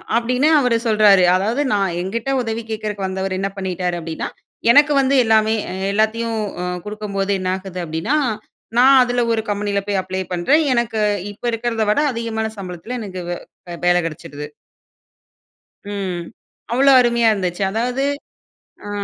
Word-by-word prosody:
அப்பிடின்னு 250 +5 +2
அவரு 250 -3 +2
சொல்றாரு. 210 -4 +5
அதாவது 220 +9 0
நான் 195 -4 0
என்கிட்ட 225 +7 -3
உதவி 225 -1 -3
கேட்கிறக்கு 210 -2 -3
வந்தவரு 190 0 -3
என்ன 195 - -1
பண்ணிட்டாரு? 180 -2 -2
அப்பிடின்னா, 165 -1 -5 0.4
எனக்கு 290 +3 +6
வந்து 270 +1 +2
எல்லாமே 220 0 +3 0.2
அ - - -5 0.2
எல்லாத்தையும் 220 +1 0 0.2
அ - - -2 0.2
குடுக்கும்போது 205 -2 -3
என்ன 185 0 -2
ஆகுது? 190 -1 -8
அப்பிடின்னா, 165 - -1 0.6
நான் 265 +1 +7
அதில 245 0 0
ஒரு 225 - +1
கம்பெனியில 205 0 -1
போய் 200 -2 0
அப்ளை 185 0 -4
பண்றேன். 275 - +3
எனக்கு 235 -2 0 0.3
இப்ப 205 - -18
இருக்கிறத 230 -1 -1
விட 215 - +2
அதிகமான 225 -1 -2
சம்பளத்தில, 185 +5 -6
எனக்கு 185 -4 -6
வே 175 0 -8
வேலை 175 0 +4
கிடைச்சுடுது. 150 -2 -7 1.5
ம். 185 -4 -3 0.5
அவ்ளோ 275 +3 +4
அருமையா 235 -2 +3
இருந்துச்சு. 185 -2 -2
அதாவது, 245 +5 -1 0.8
ஆ. - - -6
210 Hz, 140 wpm, -19 LUFS, 185-235 Hz, 1.5 s, நான்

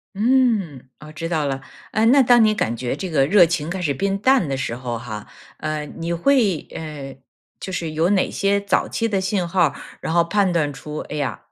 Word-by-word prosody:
嗯， 210 - +1
哦， 150 0 -11
知 165 +2 -5
道 160 -3 0
了， 135 -1 -2 0.3
呃， 220 - +1
那 270 +4 +6
当 240 -2 +6
你 215 -1 +3
感 115 - -1
觉 125 +2 -3
这 185 +4 -5
个 140 -4 +3
热 190 0 +6
情 165 -2 -2
开 185 +1 -4
始 145 -5 0
变 195 +7 -1
淡 260 - +3
的 135 -1 -2
时 130 -3 -3
候 120 -1 -4
哈， 110 -2 -7 0.3
呃， 155 -1 -3
你 165 +3 -6
会 205 - +2
呃， 145 -4 -7 0.4
就 190 - -6
是 170 -3 -3
有 160 +4 +1
哪 190 - +2
些 200 0 +1
早 200 - 0
期 230 - -1
的 195 -4 0
信 190 -2 -1
号 175 -1 +3
儿？ - - -7 0.3
然 - - -3
后 170 0 +4
判 195 +2 +1
断 155 -4 0
出， 150 +2 -8
哎 150 - -7
呀， 145 - -3
170 Hz, 235 characters per minute, -21 LUFS, 145-200 Hz, 0.4 s, 那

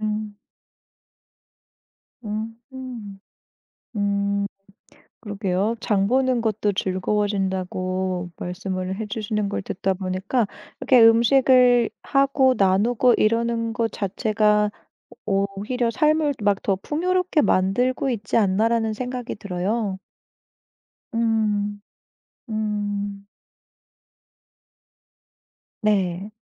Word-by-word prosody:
음. 215 -1 -3 1.9
음음. 225 0 -7 0.8
음. 200 0 0 0.8
그러게요. 205 0 -1
장 200 -2 +1
보는 255 0 +2
것도 215 -2 0
즐거워진다고 185 -2 -1
말씀을 185 +1 -4
해주시는 210 -1 -2
걸 - - -3
듣다 190 0 -2
보니까 190 +5 -1 0.3
이렇게 255 -2 +5
음식을 245 +1 +5
하고 275 -1 +3
나누고 215 +6 +3
이러는 230 +1 +1
것 230 -1 -1
자체가 210 +1 +1 0.5
오히려 200 +4 -1
삶을 305 +3 +2
막 200 -1 +2
더 195 - +1
풍요롭게 355 - 0
만들고 245 +7 +1
있지 215 -4 -1
않나라는 220 +2 +2
생각이 250 +1 -5
들어요. 200 +1 -2 1.2
음. 210 -3 0 0.7
음. 205 -2 -3 2.6
네. 195 -2 0
210 Hz, 180 characters per minute, -23 LUFS, 195-235 Hz, 2.6 s, 이렇게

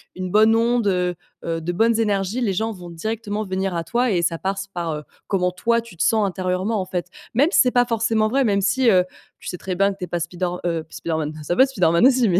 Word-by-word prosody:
une 185 -1 -4
bonne 220 +2 +5
onde, 230 -1 +2
heu, 180 -2 +1 0.3
heu, 165 -1 -2
de 165 +2 -3
bonnes 225 +4 +2
énergies, 205 +1 0
les 210 -5 +1
gens 220 +4 -1
vont 180 -4 -9
directement 210 +4 -3
venir 190 -2 -2
à 165 - -1
toi 245 +6 0
et 180 -4 +1
ça 170 -1 0
passe 195 +1 -3
par, 175 -4 -4
heu, 150 0 -5 0.2
comment 180 -2 +1
toi, 235 +5 +1
tu 230 -7 -15
te 160 - +1
sens 215 +4 +3
intérieurement 185 +3 -1
en 185 - -2
fait. 180 -2 -3 0.3
Même 285 +8 +4
si - - +4
c'est 250 - +3
pas 245 0 +3
forcément 225 -2 +1
vrai, 270 +3 +2
même 200 -3 +2
si, 230 +6 +3
heu, 185 -4 +5 0.4
tu - - -7
sais 180 - -5
très 185 +1 -4
bien 195 +2 +3
que 195 - -9
tu 180 - -4
es - - -15
pas 175 - -2
Spider 175 +2 -2 0.2
heu 165 -2 -1
pas 160 - -22
Spider-Man, 160 -2 -3
ça 175 +4 -1
va 260 - +6
Spider-Man 180 -5 +3
aussi 255 -4 +3
mais, 180 0 +3
195 Hz, 260 wpm, -22 LUFS, 175-225 Hz, 0.4 s, va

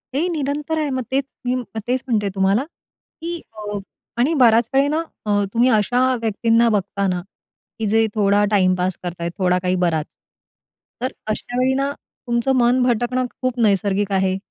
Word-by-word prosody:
हे 320 +6 +1
निरंतर 300 0 -2
आहे. 300 -2 -1
मग 260 -1 -2
तेच 270 +1 +2 0.2
मी 250 +1 +1 0.3
तेच 255 +1 0
म्हणते 210 -5 +1
तुम्हाला, 195 +5 +2 0.6
की 340 0 -4
अ, 210 -1 -5 0.4
आणि 275 +7 +3
बऱ्याच 235 -5 +4
वेळी 275 +1 +4
ना 310 +2 0 0.2
अ, 205 -1 +2
तुम्ही 240 +2 +4
अशा 245 +3 +3 0.2
व्यक्तींना 230 +1 +2
बघताना, 200 -3 0 0.6
की 220 - -1
जे 225 +1 +3
थोडा 205 -1 +3
टाइमपास 185 -2 +2
करतायेत, 170 -1 -4
थोडा 180 -1 +2
काही 180 0 +1
बराच. 160 -3 0 1.0
तर 255 +2 -1 0.2
अश्या 245 +3 -4
वेळी 260 +1 +3
ना, 275 +1 0 0.4
तुमचं 240 +3 +1
मन 245 +1 +3
भटकणं 245 +1 +1 0.2
खूप 255 -1 -1
नैसर्गिक 200 -1 +1
आहे. 190 0 +1
230 Hz, 155 wpm, -21 LUFS, 200-255 Hz, 1.0 s, बऱ्याच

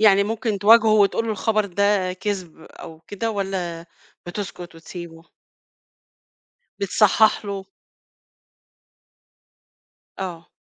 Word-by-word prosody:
يعني 200 -2 +6
ممكن 220 -1 -2
تواجهُه 220 +2 +6
وتقول 210 +2 +3
له 220 - 0
الخبر 215 0 0
ده 195 0 +1
كذب 185 -3 -5
أو 160 0 -12
كده، 205 +6 -4
والَّا 185 -4 -4 0.4
بتسكت 175 -2 -7
وتسيبُه؟ 165 0 -11 1.5
بتصحَّح 215 +2 +3
له. 195 -1 -5 2.5
آه. 175 -3 -6
195 Hz, 90 wpm, -22 LUFS, 175-215 Hz, 2.5 s, يعني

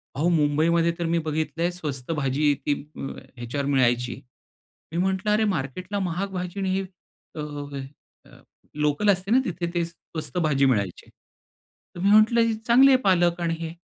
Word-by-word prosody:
अहो 155 +5 +1
मुंबईमध्ये 165 +1 +2
तर 170 - -1
मी 165 +1 +1
बघितलंय 160 +2 -1
स्वस्त 150 -5 -5
भाजी 145 -1 0
आहे 145 - +4
ती 145 - +2 0.6
ह्याच्यावर 125 +4 -3
मिळायची. 125 -3 +1 0.8
मी 165 - -4
म्हटलं 190 +3 0
अरे 215 +1 +3
मार्केटला 180 +8 -4
महाग 185 +1 -2
भाजी 180 +1 -4
आणि 190 -1 -1
हे 195 - 0 0.5
अ, 155 - -4 0.9
अ, - - -18 0.3
लोकल 150 +7 +1
असते 190 +2 +1
ना 255 - +6
तिथे 175 -1 -3
ते 170 -1 +1
स्वस्त 170 0 -7
भाजी 150 -5 +2
मिळायची. 100 -9 -1 0.9
तर - - -8
मी 195 +2 +2
म्हटलं 215 +2 +6
ही 230 0 +2
चांगली 240 +5 +5
आहे 260 - +6
पालक 175 -4 +3
आणि 170 -1 0
हे. 165 0 -5
170 Hz, 165 wpm, -25 LUFS, 145-190 Hz, 0.9 s, ना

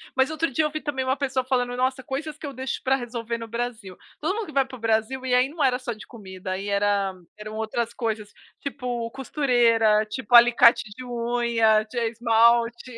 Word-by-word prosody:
mas 265 +1 +3
outro 315 -1 -1
dia 290 +5 +1
eu - - 0
vi 310 +1 -5
também 275 -3 -2
uma 260 +1 0
pessoa 265 -2 -1
falando: 245 -1 -1
"Nossa, 260 +1 -1
coisas 300 +4 -5
que - - -9
eu 280 - -6
deixo 260 +1 -4
para 265 0 +3
resolver 235 -2 -4
no 230 - -7
Brasil". 230 -5 -5 0.2
Todo 345 +7 -1
mundo 450 - -3
que - - -9
vai 275 -2 +3
para 265 0 -10
o - - -13
Brasil 225 +4 0
e 255 - 0
aí 250 +2 +4
não 315 0 -3
era 250 -1 +2
só 250 -2 -4
de 215 - -12
comida, 190 -5 -9
aí 190 +2 -4
era 200 -1 +1 0.2
eram 215 0 -8
outras 220 +1 -2
coisas, 220 -3 -3 0.3
tipo, 250 -4 -4
costureira, 235 -5 +2
tipo, 245 +3 -1
alicate 235 0 +7
de 255 - -8
unha, 235 -3 +1
t 240 +3 -10
esmalte, 235 +1 +2
240 Hz, 210 wpm, -24 LUFS, 225-265 Hz, 0.3 s, alicate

